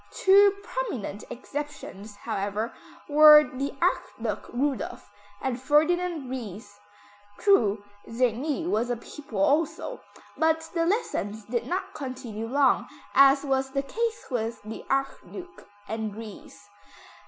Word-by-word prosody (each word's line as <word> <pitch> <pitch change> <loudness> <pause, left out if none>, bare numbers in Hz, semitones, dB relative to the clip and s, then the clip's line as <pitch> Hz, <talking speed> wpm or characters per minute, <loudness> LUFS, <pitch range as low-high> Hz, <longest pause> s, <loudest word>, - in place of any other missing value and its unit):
Two 400 +1 +5
prominent 375 - -4
exceptions, 255 -7 -7
however, 205 +3 -3 0.3
were 300 0 +9
the 275 0 -4
Archduke - - -1
Rudolph 270 -4 -2 0.3
and 255 -2 -3
Ferdinand 315 +2 +2
Ries. 205 -5 -7 0.6
True, 220 - +3 0.3
Czerny 255 +7 0
was 235 -6 0
a 245 - -1
pupil 245 -1 -9
also, 310 - +1 0.3
but 320 0 +2
the 335 -1 +1
lessons 220 - -2
did 240 +2 -2
not 365 +2 -3
continue 255 -5 -6
long, 275 +3 +3 0.3
as 275 +1 +6
was 270 -1 0
the 275 +1 -1
case 455 +10 -2
with 230 -2 -2
the 215 +1 -7
Archduke 275 +7 -4 0.2
and 220 -1 -4
Ries. 210 -2 -11
265 Hz, 115 wpm, -27 LUFS, 225-310 Hz, 0.6 s, were